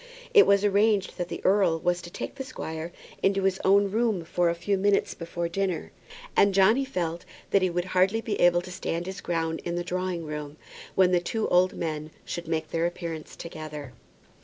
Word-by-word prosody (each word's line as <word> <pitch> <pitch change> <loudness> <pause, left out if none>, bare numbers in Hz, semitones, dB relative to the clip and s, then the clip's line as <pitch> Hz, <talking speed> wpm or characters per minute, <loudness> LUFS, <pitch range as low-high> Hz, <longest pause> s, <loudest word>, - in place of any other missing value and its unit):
It 420 - +8
was 200 0 +4
arranged 205 -1 +2
that 175 - -1
the - - -7
earl 190 -4 +3
was 175 +1 0
to 175 - -9
take - - -6
the 275 - -6
squire 165 -10 -6 0.3
into 195 0 +2
his 190 -1 +1
own 200 +1 +4
room 220 -5 0
for 175 +1 +1
a 170 - 0
few 200 +4 0
minutes 200 +1 +2
before 170 0 -4
dinner, 185 0 -2 0.4
and 200 -1 +4
Johnny 215 +8 +5
felt 175 -10 -3 0.3
that 195 - +4
he 185 - +2
would 175 0 -1
be 185 - -10
hardly 190 +5 +2 0.2
able 175 0 +5
to 180 - -10
stand 175 -2 -3
his 190 0 -6
ground 165 -1 -2
in 170 0 -3
the 175 - -1
drawing 180 -2 -3
room 150 -1 -6 0.4
when 185 -1 +5
the 180 - +4
two 220 +5 -2
old 180 +1 +4
men 155 -2 -3 0.2
should 170 -1 -5
make 160 -1 -2
their 165 +1 +1
appearance 165 -3 -6
together. 155 -5 -8
175 Hz, 200 wpm, -27 LUFS, 170-195 Hz, 0.4 s, It